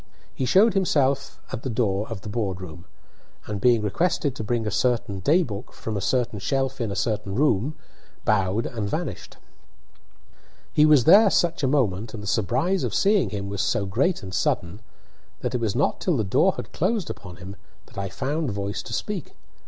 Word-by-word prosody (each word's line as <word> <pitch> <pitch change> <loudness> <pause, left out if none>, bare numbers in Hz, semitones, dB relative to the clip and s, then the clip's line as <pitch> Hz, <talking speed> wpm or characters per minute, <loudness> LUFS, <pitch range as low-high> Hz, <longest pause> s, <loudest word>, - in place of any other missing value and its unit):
He 130 - -2
just 125 - 0
showed 210 +3 +6
himself 140 -7 +1
at - - -4
the 130 - -4
door 110 -3 0
of 110 -4 -6
the 110 - -7
board 100 -4 -2
room, 85 -1 -9 0.6
and, 105 -2 -4
being 120 -3 +4
requested 145 - 0
to 110 - -4
bring 115 +1 -1
a 105 - -1
certain 115 -4 0
day 160 - +3
book 105 -4 -7
from 110 - -5
a 100 - -2
certain 115 0 0
shelf 135 +5 -1
in 115 - -1
a - - -3
certain 100 0 -2
room, 140 +1 +1 0.5
bowed 105 +1 +1
and 110 -4 -3
vanished. - - -4 1.4
He 150 0 +5
was 150 -5 +6
there 200 - +7
such 175 -1 +1
a 135 - +2
moment, 115 -6 0
and 105 - -7
the - - -7
surprise 125 - +1
of - - -2
seeing 205 -1 +3
him 100 -2 -4
was 100 0 -2
so 100 0 0
great 125 - 0
and 95 -1 -7
sudden, 90 +3 -1 0.6
that - - -2
it 125 - -1
was 110 -4 0
not 140 - +1
till 175 -6 +1
the 110 - +1
door 95 - +3
had - - -8
closed 195 +1 0
upon 90 -3 -10
him 95 +3 -9 0.3
that - - -9
I 100 0 -3
found 145 - -2
voice 100 0 -3
to - - -8
speak. - - -4
115 Hz, 200 wpm, -24 LUFS, 100-140 Hz, 1.4 s, there